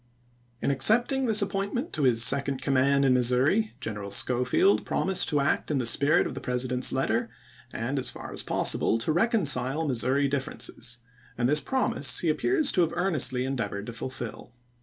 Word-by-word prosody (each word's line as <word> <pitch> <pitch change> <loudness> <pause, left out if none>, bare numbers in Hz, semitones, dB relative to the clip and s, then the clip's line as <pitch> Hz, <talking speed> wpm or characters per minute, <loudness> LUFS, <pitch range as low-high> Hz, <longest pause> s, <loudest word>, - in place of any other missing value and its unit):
In - - +1
accepting 240 - +2
this 215 -2 +4
appointment 200 - -4
to 155 - -3
his 120 -4 +3
second 135 +2 +2
command 140 +1 +1
in 130 - +3
Missouri, 125 - +1
General 105 -2 -6
Schofield 125 - +1
promised 190 -1 0
to 145 - 0
act 140 - -1
in 150 - -1
the 125 - -2
spirit 145 +7 +3
of - - -5
the - - -8
President's 125 0 +1
letter, 120 -3 -1 0.4
and 130 +5 -3
as 130 - +1
far - - -9
as - - 0
possible 115 - 0
to 115 +7 -2
reconcile 160 - +1
Missouri 135 +2 0
differences, 130 -3 -3 0.4
and 120 0 0
this 150 +3 +3
promise 140 - +1
he 170 - 0
appears 305 - +1
to 180 - +1
have 165 -2 0
earnestly 155 -8 0
en 135 +1 -3
deavored 100 -4 -5
to 120 - -8
fulfill. 120 0 -8
135 Hz, 175 wpm, -26 LUFS, 125-170 Hz, 0.4 s, this